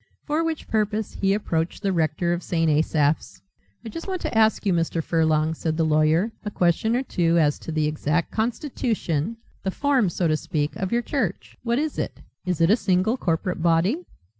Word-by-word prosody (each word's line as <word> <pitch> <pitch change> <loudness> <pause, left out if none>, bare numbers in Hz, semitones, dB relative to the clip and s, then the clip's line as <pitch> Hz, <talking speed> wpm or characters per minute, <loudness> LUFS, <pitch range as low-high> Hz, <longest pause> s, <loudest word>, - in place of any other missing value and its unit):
For 310 +2 0
which 325 -2 -3
purpose 215 0 -1
he 195 -1 +1
approached 170 -5 -1
the 195 -1 +1
rector 165 +1 +1
of 175 - -2
St. 165 -2 0
Asaph's. 150 - +1 0.4
"I - - -5
just 330 - -7
want 375 -1 -2
to - - -3
ask 220 0 +3
you, 195 - +3
Mr. 165 -1 0
Furlong," 160 -1 +2
said 160 0 -2
the 165 - +2
lawyer, 155 +6 +3
"a 210 - -3
question 200 +4 +1
or 255 - 0
two 170 -8 +1
as 150 -3 +2
to - - -7
the 155 -1 +1
exact 150 +2 -1
constitution, 225 - -1 0.2
the 190 - -2
form 260 -2 +2
so 170 0 0
to 155 - +2
speak, 150 -1 -2
of 190 -1 -3
your 240 0 +1
church. 230 - -3
What 235 0 0
is 300 +1 -1
it? - - -4 0.3
Is 180 -3 0
it 165 +3 +5
a - - +7
single 190 +1 +1
corporate 180 -4 -1
body?" 175 - +2
180 Hz, 195 wpm, -24 LUFS, 160-225 Hz, 0.4 s, a